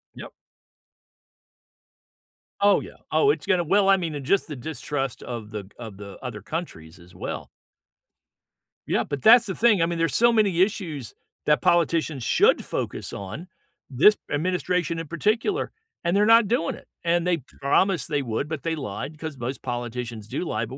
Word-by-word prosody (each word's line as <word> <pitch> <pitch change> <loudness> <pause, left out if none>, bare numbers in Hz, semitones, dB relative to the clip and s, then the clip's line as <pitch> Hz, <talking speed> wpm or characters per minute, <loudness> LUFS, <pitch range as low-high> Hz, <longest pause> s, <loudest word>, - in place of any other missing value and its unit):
Yep. - - -9 2.3
Oh, 200 0 +5
yeah, - - -10 0.2
oh, 420 - +4
it's - - -4
gonna 185 -3 +2
Well, 195 +4 +3
I 195 - +6
mean, 160 -6 -3
just 195 +8 +1
the 150 - -6
distrust 135 -1 -4
of 115 -4 -6
the 105 -2 -5
g 95 - -17
of 110 -5 -8
the 100 -1 -9
other 115 -5 -6
countries 95 - -6
as 85 +1 -17
well. - - -5 1.4
Yeah, - - +1
but 140 -2 -5
that's 235 +1 +7
the 190 -4 -4
thing, 220 -6 +4
I - - +4
mean, 170 0 -3
there's 165 -3 +1
so 235 0 +5
many 200 -6 +3
issues 170 - -1 0.3
that 150 0 +3
politicians 165 -5 +2
should - - +3
focus - - -4
on, 105 - -7 0.4
this 150 +11 +5
administration 175 +1 0
in 165 - -5
particular, 215 - 0 0.3
and 170 +2 +1
they're 205 - +4
not 230 -1 +6
doing 195 -7 0
it, - - -16 0.2
and 170 +1 +1
they 175 -2 +2 0.2
promised 180 +6 +2
they 145 -3 0
would, 120 +3 -2
but 155 -2 -5
they 165 -1 -1
lied, 145 +2 -6
'cause 155 -4 -6
most 125 +3 -4
politicians 120 -2 -5
do 175 - -3
lie, - - -2
but 130 - -9
160 Hz, 175 wpm, -25 LUFS, 125-185 Hz, 2.3 s, that's